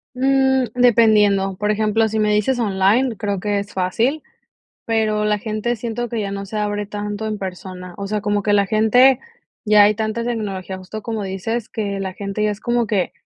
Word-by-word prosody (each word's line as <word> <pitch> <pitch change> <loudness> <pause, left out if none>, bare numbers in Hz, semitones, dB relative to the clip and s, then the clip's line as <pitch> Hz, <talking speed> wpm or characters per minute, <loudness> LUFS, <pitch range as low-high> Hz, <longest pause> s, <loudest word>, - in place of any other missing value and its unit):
Mm, 265 0 +2
dependiendo. 210 -5 +4
Por 210 +2 0
ejemplo, 215 +1 +1
si 220 +1 -1
me 210 0 +2
dices 230 +5 +1
online, 220 +4 +2
creo 200 -2 -2
que 205 +1 -1
es 200 0 -7
fácil, 225 +11 0 0.6
pero 215 -2 0
la 210 0 +1
gente 215 +3 -2
siento 235 +1 -4
que 230 -1 -3
ya 200 -1 -3
no 200 0 -4
se 200 +2 -7
abre 205 0 -2
tanto 210 +1 -4
en 215 -1 -3
persona. 180 -1 -7
O 200 - -5
sea, 210 +1 -1
como 205 0 0
que 205 - +1
la 200 -1 +3
gente, 240 +5 +4 0.4
ya 210 -1 +6
hay 210 +1 +4
tanta 220 +2 -2
tecnología, 200 -5 -4
justo 190 +3 -8
como 220 -1 -3
dices, 200 +4 -3
que 200 -3 -3
la 190 -1 -4
gente 200 +1 -4
ya 210 - +2
es 205 - -5
como 240 0 0
que 200 -5 0
210 Hz, 200 wpm, -20 LUFS, 200-225 Hz, 0.6 s, ya